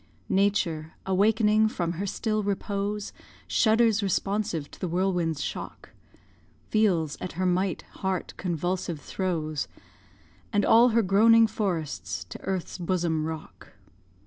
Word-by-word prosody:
Nature, 180 Hz, -5 st, +1 dB
awakening 215 Hz, +3 st, +3 dB
from 175 Hz, -5 st, -2 dB
her 185 Hz, +4 st, -3 dB
still 215 Hz, +2 st, -1 dB
repose, 200 Hz, 0 st, -2 dB, 0.3 s
Shudders 225 Hz, -1 st, +3 dB
responsive 195 Hz, -5 st, -1 dB
to -, -, -13 dB
the 185 Hz, -, -2 dB
whirlwind's 175 Hz, -3 st, 0 dB
shock, -, -, -6 dB, 0.8 s
Feels 175 Hz, -9 st, +1 dB
at 180 Hz, -, -5 dB
her 185 Hz, +3 st, -1 dB
mighty 185 Hz, +1 st, 0 dB
heart 190 Hz, -1 st, -2 dB
convulsive 175 Hz, -1 st, -2 dB
throes, 155 Hz, -2 st, -2 dB, 0.8 s
And 205 Hz, -3 st, +2 dB
all 235 Hz, +2 st, +6 dB
her 230 Hz, 0 st, +3 dB
groaning 225 Hz, +4 st, +6 dB
forests 155 Hz, -, -3 dB
to -, -, -8 dB
earth's 190 Hz, -1 st, -3 dB
bosom 170 Hz, -3 st, 0 dB
rock. 160 Hz, -1 st, -8 dB
190 Hz, 120 wpm, -27 LUFS, 165-210 Hz, 0.8 s, all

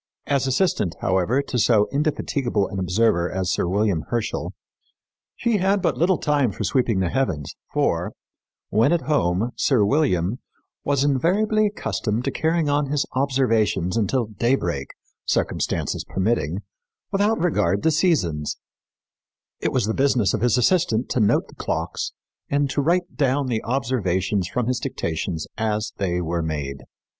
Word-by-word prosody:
As 140 Hz, -2 st, +1 dB
assistant, 130 Hz, -, +1 dB
however, 95 Hz, +9 st, +1 dB
to 125 Hz, -3 st, -2 dB
so 105 Hz, -1 st, +4 dB
indefatigable 140 Hz, -, 0 dB
an 95 Hz, -, -4 dB
observer 90 Hz, -1 st, +1 dB
as 95 Hz, 0 st, -1 dB
Sir 90 Hz, -, 0 dB
William 100 Hz, -2 st, +1 dB
Herschel, 120 Hz, -2 st, -2 dB, 0.8 s
she 235 Hz, -3 st, +1 dB
had 195 Hz, +1 st, +2 dB
but -, -, 0 dB
little 175 Hz, +2 st, +2 dB
time 145 Hz, -6 st, +1 dB
for 100 Hz, -, -5 dB
sweeping 105 Hz, 0 st, +1 dB
the 90 Hz, -, 0 dB
heavens, 120 Hz, -, -1 dB, 0.2 s
for, -, -, 0 dB, 0.6 s
when 115 Hz, +7 st, +3 dB
at 170 Hz, -, +1 dB
home, 115 Hz, -, +1 dB
Sir 120 Hz, -7 st, +3 dB
William 105 Hz, -, +1 dB, 0.4 s
"was 140 Hz, -1 st, +1 dB
invariably 200 Hz, -, +2 dB
accustomed 120 Hz, -, -2 dB
to 135 Hz, -, 0 dB
carry 160 Hz, +1 st, 0 dB
on 145 Hz, 0 st, +1 dB
his 145 Hz, 0 st, 0 dB
observations 115 Hz, -9 st, +1 dB
until 115 Hz, +3 st, +1 dB
day 115 Hz, +4 st, +1 dB
break, 75 Hz, -, -3 dB, 0.4 s
circumstances -, -, -1 dB
permitting, 95 Hz, -2 st, -1 dB, 0.5 s
without 205 Hz, +2 st, +2 dB
regard 100 Hz, -, +1 dB
to 160 Hz, -, +4 dB
seasons; 130 Hz, -, +1 dB, 1.0 s
it -, -, -1 dB
was 125 Hz, -5 st, +1 dB
the 110 Hz, -, -1 dB
business 130 Hz, -6 st, +2 dB
of -, -, -1 dB
his 120 Hz, 0 st, +3 dB
assistant 125 Hz, -4 st, +2 dB
to -, -, 0 dB
note 105 Hz, -2 st, +2 dB
the -, -, -16 dB
clocks -, -, -3 dB, 0.4 s
and 140 Hz, -1 st, +1 dB
to 145 Hz, -, 0 dB
write 175 Hz, +4 st, 0 dB
down 140 Hz, -1 st, +2 dB
the 120 Hz, -4 st, -2 dB
observations 105 Hz, -7 st, 0 dB
from 125 Hz, +4 st, -2 dB
his 125 Hz, +1 st, 0 dB
dictations 85 Hz, -, -3 dB
as 110 Hz, -1 st, -1 dB
they 90 Hz, -3 st, -1 dB
were 85 Hz, 0 st, -1 dB
made. 75 Hz, -4 st, -4 dB
120 Hz, 150 wpm, -23 LUFS, 95-145 Hz, 1.0 s, so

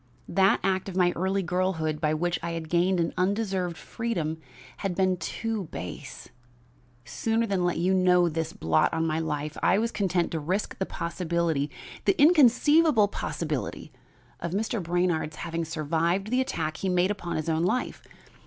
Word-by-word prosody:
That 195 Hz, 0 st, +4 dB
act 190 Hz, 0 st, 0 dB
of 185 Hz, -, -7 dB
my 180 Hz, -1 st, +4 dB
early 190 Hz, +2 st, 0 dB
girlhood 170 Hz, -3 st, -1 dB
by 155 Hz, 0 st, +1 dB
which 175 Hz, +2 st, -1 dB
I 170 Hz, 0 st, -3 dB
had 165 Hz, -1 st, -5 dB
gained 175 Hz, +2 st, +2 dB
an 165 Hz, -, 0 dB
undeserved 190 Hz, -2 st, 0 dB
freedom 180 Hz, -9 st, -3 dB, 0.4 s
had 195 Hz, -3 st, -3 dB
been 185 Hz, 0 st, +2 dB
too 220 Hz, +2 st, -3 dB
base; 90 Hz, -, -8 dB, 0.8 s
sooner 225 Hz, -, 0 dB
than 195 Hz, -4 st, 0 dB
let 175 Hz, -1 st, 0 dB
you 180 Hz, +3 st, +2 dB
know 180 Hz, -1 st, +4 dB
this 165 Hz, -1 st, -2 dB
blot 80 Hz, -1 st, +1 dB
on 160 Hz, 0 st, 0 dB
my 160 Hz, 0 st, 0 dB
life, 150 Hz, -1 st, -3 dB
I 190 Hz, -, +4 dB
was 230 Hz, +2 st, 0 dB
content 185 Hz, -4 st, 0 dB
to 160 Hz, -, -2 dB
risk 185 Hz, +7 st, -2 dB
the 190 Hz, -, -1 dB
possibility 170 Hz, -3 st, -1 dB, 0.4 s
the -, -, +2 dB
inconceivable 295 Hz, -, +5 dB
possibility 155 Hz, -6 st, -4 dB, 0.5 s
of 170 Hz, 0 st, -4 dB
Mr. 220 Hz, +2 st, -1 dB
Brainard's 175 Hz, -2 st, 0 dB
having 165 Hz, +1 st, -3 dB
survived 165 Hz, +6 st, -1 dB
the 255 Hz, +1 st, +3 dB
attack 155 Hz, -11 st, -2 dB
he 195 Hz, -, -3 dB
had 180 Hz, -, +1 dB
made 180 Hz, +2 st, +3 dB
upon 185 Hz, -4 st, -4 dB
his 155 Hz, 0 st, -3 dB
own 160 Hz, 0 st, +1 dB
life. 180 Hz, +9 st, -1 dB
175 Hz, 170 wpm, -27 LUFS, 160-195 Hz, 0.8 s, inconceivable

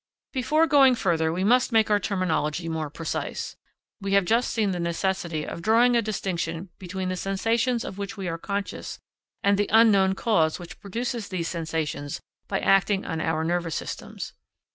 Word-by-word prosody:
Before 305 Hz, +5 st, +3 dB
going 275 Hz, -4 st, +6 dB
further, 165 Hz, -7 st, +1 dB
we 180 Hz, +3 st, -1 dB
must 250 Hz, +5 st, +3 dB
make 220 Hz, -1 st, +3 dB
our 205 Hz, -, +4 dB
terminology 180 Hz, -4 st, -1 dB
more 160 Hz, -2 st, -2 dB
precise. 160 Hz, +2 st, -4 dB, 0.5 s
We 195 Hz, 0 st, -2 dB
have 200 Hz, -2 st, +4 dB
just 230 Hz, +6 st, +2 dB
seen 215 Hz, -4 st, +1 dB
the 180 Hz, -, -3 dB
necessity 170 Hz, -2 st, -1 dB
of -, -, -6 dB
drawing 235 Hz, +5 st, +4 dB
a 235 Hz, -, +4 dB
distinction 185 Hz, -4 st, -3 dB
between 185 Hz, 0 st, -4 dB
the 185 Hz, -, -1 dB
sensations 225 Hz, +6 st, 0 dB
of 195 Hz, -, -7 dB
which 200 Hz, +2 st, -5 dB
we 190 Hz, -2 st, -4 dB
are 165 Hz, -1 st, -3 dB
conscious 200 Hz, +2 st, -4 dB, 0.5 s
and 200 Hz, 0 st, +3 dB
the 205 Hz, -, +1 dB
unknown 200 Hz, -4 st, +5 dB
cause 180 Hz, -9 st, +2 dB
which 175 Hz, -1 st, -10 dB
produces 230 Hz, +2 st, -3 dB
these 175 Hz, -3 st, -2 dB
sensations 160 Hz, -4 st, -3 dB, 0.3 s
by 195 Hz, -, -1 dB
acting 195 Hz, 0 st, +3 dB
on 160 Hz, -, -3 dB
our 160 Hz, -1 st, 0 dB
nervous 170 Hz, -1 st, -1 dB
systems. -, -, -6 dB
190 Hz, 170 wpm, -26 LUFS, 170-220 Hz, 0.5 s, going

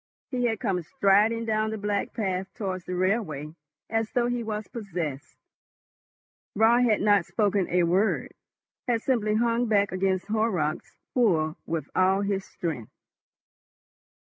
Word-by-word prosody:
He 250 Hz, -2 st, 0 dB
had 225 Hz, -3 st, 0 dB
come 180 Hz, -2 st, 0 dB
striding 210 Hz, +7 st, +2 dB
down 215 Hz, -1 st, 0 dB
the 220 Hz, -, -3 dB
black 205 Hz, -1 st, -1 dB
path 190 Hz, -3 st, -2 dB
towards 185 Hz, -4 st, -4 dB
the 180 Hz, -, -4 dB
railway 180 Hz, -6 st, -1 dB, 0.3 s
as 225 Hz, 0 st, -1 dB
though 245 Hz, -2 st, +2 dB
he 245 Hz, 0 st, -1 dB
was 215 Hz, -2 st, -4 dB
possessed. 175 Hz, -, -5 dB, 1.2 s
Raut 235 Hz, +3 st, +5 dB
had 215 Hz, -3 st, +2 dB
not 205 Hz, -2 st, +4 dB
spoken 200 Hz, 0 st, 0 dB
a 180 Hz, 0 st, +3 dB
word, 185 Hz, +6 st, +1 dB, 0.5 s
had 230 Hz, -2 st, +1 dB
simply 215 Hz, -5 st, +1 dB
hung 235 Hz, +1 st, +1 dB
back 205 Hz, -2 st, +2 dB
against 185 Hz, 0 st, 0 dB
Horrocks' 210 Hz, -8 st, -1 dB, 0.2 s
pull 165 Hz, -10 st, +2 dB
with 160 Hz, -3 st, -2 dB
all 190 Hz, +1 st, +3 dB
his 200 Hz, -1 st, -1 dB
strength. 145 Hz, -11 st, -5 dB
205 Hz, 140 wpm, -26 LUFS, 180-225 Hz, 1.2 s, Raut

